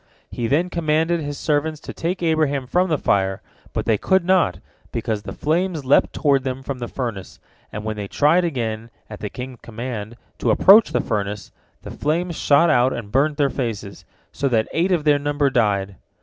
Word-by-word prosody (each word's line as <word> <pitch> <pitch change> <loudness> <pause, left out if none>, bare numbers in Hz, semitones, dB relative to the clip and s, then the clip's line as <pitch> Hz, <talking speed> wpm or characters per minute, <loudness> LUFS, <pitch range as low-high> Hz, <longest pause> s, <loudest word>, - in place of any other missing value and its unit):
He 120 - -2
then 170 +8 +1
commanded 165 +1 +1
his 145 -2 -5
servants 155 0 -1
to - - -8
take 175 +2 -3
Abraham 155 -5 +1
from 180 +8 +1
the 155 - +2
fire, 95 -5 +1 0.3
but - - -3
they 110 -3 +2
could 190 -2 +2
not, 185 -1 +3 0.3
because 110 -2 -2
the - - -8
flames 165 -1 -1
leapt 135 - +4
toward 140 -4 +2
them 130 0 -4
from 135 -1 -5
the 120 - -4
furnace, 115 -9 -5 0.3
and 105 - -6
when 110 0 -4
they 100 -1 -4
tried 155 - +3
again, 115 -8 -3 0.2
at 105 - -8
the 105 - -4
king's 125 +1 -8
command, 115 -1 -6 0.2
to 120 - 0
approach 195 - +6
the - - +1
furnace, 100 -1 -3 0.3
the - - -8
flames 170 +3 -1
shot 155 +3 +4
out 125 -2 +3
and 105 -3 -7
burnt 145 +4 +2
their 140 -3 +2
faces, 110 -6 -4 0.3
so 140 - -1
that 115 -4 +1
eight 175 +4 +1
of 170 -4 +1
their 145 -1 +3
number 145 -1 0
died. 100 -6 0
140 Hz, 190 wpm, -21 LUFS, 110-160 Hz, 0.3 s, approach